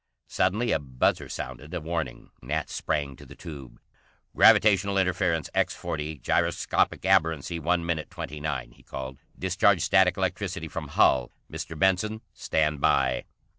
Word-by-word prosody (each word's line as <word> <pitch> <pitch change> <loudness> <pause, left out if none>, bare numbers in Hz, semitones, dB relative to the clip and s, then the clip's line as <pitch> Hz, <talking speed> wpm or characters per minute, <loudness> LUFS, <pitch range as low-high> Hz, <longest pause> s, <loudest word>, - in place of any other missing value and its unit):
Suddenly 105 +5 +1
a - - +2
buzzer 65 -3 0
sounded 65 +6 -6
a - - -1
warning. 80 -5 -4
Nat 75 +5 -3
sprang 70 -3 -2
to - - -13
the - - -13
tube. 70 -6 -10 0.6
"Gravitational 100 -2 +5
interference 90 -3 +1
X40, 75 -1 -2
gyroscopic - - +1
aberrancy 80 +1 +2
one 85 +2 0
minute 80 -2 -2
29," 75 -4 -5
he - - -21
called. 65 0 -7 0.2
"Discharge 95 -1 +2
static 90 -1 +4
electricity 90 -3 -2
from 80 -1 -6
hull. 65 -3 +3 0.2
Mr. 80 - -6
Benson, 95 +5 +1
stand 75 -2 0
by." 65 -1 +2
80 Hz, 135 wpm, -27 LUFS, 70-90 Hz, 0.6 s, Gravitational